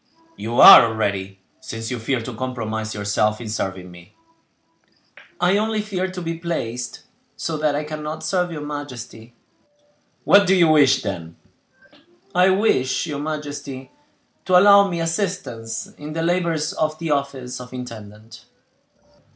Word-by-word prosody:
"You 120 +2 -3
are - - +11
already, 100 -3 -3 0.2
since 115 +1 -7
you 125 - -3
fear 120 +2 -1
to 120 +2 -7
compromise 110 -3 -4
yourself 105 +1 0
in 115 -3 -7
serving 95 -4 -4
me." 90 +2 -16 1.2
"I 180 +3 +3
only 215 0 -1
fear 190 -3 -3
to 185 -1 -7
be 165 0 -4
placed 125 -8 -4 0.3
so 165 - -3
that 150 -1 0
I 150 - -2
cannot 155 +1 -6
serve 180 0 -1
your 150 -2 -6
majesty." 125 -5 -8 0.9
"What 200 -1 +5
do 190 - +4
you 170 -3 +4
wish, 145 -4 +4
then?" 85 -5 -6 1.0
"I 180 +1 +4
wish 190 -11 +1
your 150 -4 -5
majesty 145 -3 -6 0.5
to 185 - +5
allow 200 +1 +7
me 170 -2 -3
assistance 165 - -4
in 150 +1 -7
the 165 +1 -2
labors 170 -1 0
of 155 -4 -1
the 165 -1 -3
office 135 -3 -3
of 125 - -11
intendant." 110 -3 -10
145 Hz, 145 wpm, -21 LUFS, 115-170 Hz, 1.2 s, are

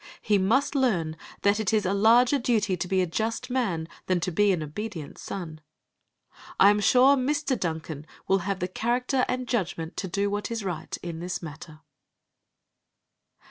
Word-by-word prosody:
He 205 -1 +3
must 235 +11 +2
learn 190 - +1 0.3
that 200 +1 +3
it 215 -4 0
is 215 -2 +2
a 190 - +1
larger 235 +7 +5
duty 220 -6 +1
to 180 - -4
be 185 0 +2
a - - +1
just 220 +8 -3
man 190 -11 -1 0.2
than 185 -1 +2
to 180 - -1
be 205 +4 +3
an 170 -4 0
obedient 160 0 -6
son. 160 -5 -6 1.0
I 200 - +8
am 210 - +1
sure 255 +6 +5
Mr. 280 +1 0
Duncan 160 -3 -4 0.2
will 195 0 +3
have 190 +1 -3
the 180 - 0
character 250 +6 0
and 255 0 -2
judgment 175 -8 -2
to 190 - -2
do 200 +3 0
what 205 0 -2
is 230 -2 -3
right 170 -4 -4
in 170 -2 -5
this 180 +1 -4
matter. 155 0 -10
200 Hz, 175 wpm, -26 LUFS, 175-235 Hz, 1.0 s, I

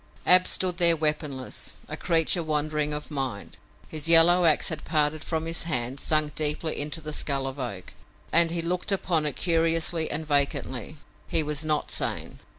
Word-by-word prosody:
Ab 180 0 +6
stood 185 -1 +1
there 170 -1 +5
weaponless, 150 -4 -2
a - - -5
creature 165 +1 +1
wandering 150 -1 -1
of 150 +1 -6
mind. 130 -8 -5 0.3
His 155 +1 -2
yellow 170 +2 +7
ax 155 +2 +3
had 160 -3 -5
parted 150 -1 0
from 160 -1 -3
his 165 0 -2
hand, 130 -4 -2
sunk 155 0 +1
deeply 155 +1 -1
into 150 +3 -3
the 155 0 -7
skull 140 -2 -1
of 135 +1 -6
Oak, 100 -8 -6 0.4
and 170 0 +5
he 165 0 -2
looked 180 +3 -2
upon 170 -5 0
it 145 - -2
curiously 165 -1 +1
and 155 +2 -3
vacantly. 140 -1 -2 0.3
He 160 - +1
was 150 0 -2
not 155 -1 -1
sane. - - -3
155 Hz, 170 wpm, -25 LUFS, 150-165 Hz, 0.4 s, yellow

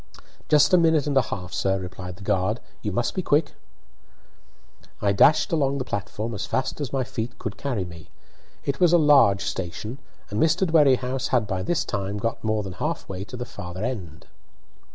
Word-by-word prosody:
"Just 150 +4 +5
a 180 - +7
minute 160 -3 +3
and 145 -1 -1
a 135 - +6
half, 90 -5 -6
sir," 95 0 +1
replied 90 -1 -7
the 100 - -12
guard. 100 +4 0 0.2
"You 105 - -2
must 120 +5 -1
be 185 - -1
quick." 145 -2 +2 1.5
I 100 - +2
dashed 140 +10 +4
along 140 -4 +1
the 130 - -1
platform 110 +1 -4
as 105 0 -4
fast 130 +3 -2
as 140 - -3
my 135 -1 0
feet 115 -1 -5
could 110 -3 -5
carry 120 -9 -2
me. 85 -2 -11 0.6
It 140 -1 -1
was 175 -2 +5
a - - +8
large 140 -11 +5
station, 105 +8 -4 0.3
and 105 - -1
Mr. 165 +4 +3
Dwerrihouse 135 -6 +3
had 120 -4 +2
by 95 -3 -2
this 170 - 0
time 100 +1 -3
got 115 +2 -3
more 110 -1 0
than 95 -2 -6
half 90 - -3
way 95 0 -5
to 125 - -8
the 125 - -4
farther 95 -3 -7
end. 95 -11 -5
115 Hz, 195 wpm, -24 LUFS, 100-140 Hz, 1.5 s, a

